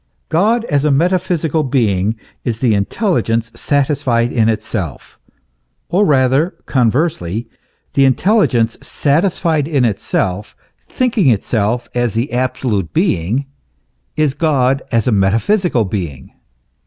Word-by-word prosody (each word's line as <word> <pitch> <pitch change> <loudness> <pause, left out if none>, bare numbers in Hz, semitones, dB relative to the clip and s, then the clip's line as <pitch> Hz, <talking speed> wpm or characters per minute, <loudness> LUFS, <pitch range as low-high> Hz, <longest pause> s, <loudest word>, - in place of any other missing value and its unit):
God, 220 +8 +2
as 145 -7 0
a 150 - +2
metaphysical 165 0 +1
being, 110 -7 0 0.3
is 115 -3 -2
the 115 -2 +2
intelligence 115 - 0
satisfied 130 -4 0
in 115 -2 +2
itself, 110 - -4 0.7
or 195 +4 +2
rather, 135 +4 +2
conversely, 120 - 0 0.5
the 135 -1 +4
intelli 205 - +3
gence 115 -2 -1
satisfied 155 0 0
in 140 -6 +1
itself, 100 -2 -2 0.2
thinking 230 - 0
itself 115 +1 0
as 120 -3 -1
the 120 +5 -1
absolute 120 - -1
being, 105 +12 0 0.7
is 155 -3 +2
God 135 -4 +1
as 115 -3 +1
a 125 - +1
metaphysical 115 - +1
being. 85 -9 -5
130 Hz, 115 wpm, -16 LUFS, 110-155 Hz, 0.7 s, the